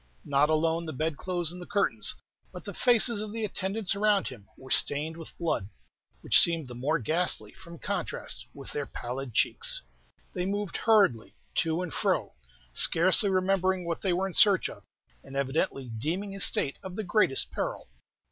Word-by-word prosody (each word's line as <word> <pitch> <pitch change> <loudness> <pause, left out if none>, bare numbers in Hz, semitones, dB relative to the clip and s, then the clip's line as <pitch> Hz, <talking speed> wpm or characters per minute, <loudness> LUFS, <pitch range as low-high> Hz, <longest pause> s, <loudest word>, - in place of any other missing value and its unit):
Not 145 +1 +2
alone 160 +1 0
the 155 - -5
bedclothes 165 +4 -1
and 180 0 -8
the 175 - -9
curtains, 200 -1 +2 0.4
but - - -10
the - - -5
faces 235 -3 +4
of 215 -1 -5
the 225 0 -3
attendants 195 +1 -1
around 205 -1 +1
him, 105 -7 -13
were 130 0 -13
stained 150 +3 +2
with 165 -1 -11
blood, 160 - -2 0.5
which - - +5
seemed 165 -3 +4
the 125 - -9
more 140 +7 -1
ghastly 170 +2 0
from 170 -2 -12
contrast - - -3
with - - -10
their - - -4
pallid 125 0 -6
cheeks. - - +2 0.5
They 180 0 -2
moved 205 -2 -3
hurriedly 200 - +2 0.2
to 165 +2 0
and 170 - -6
fro, - - -1 0.4
scarcely 185 - +4
remembering 185 -1 +1
what 170 -1 -3
they 190 - 0
were 180 +2 0
in 190 - -5
search 200 -1 +6
of, - - -11 0.4
and 135 0 -11
evidently 135 -2 -2
deeming 175 - -3
his 195 -1 +1
state 140 - 0
of 190 -1 -8
the 220 - -3
greatest 185 -7 +1
peril. - - -4
175 Hz, 175 wpm, -28 LUFS, 150-195 Hz, 0.5 s, search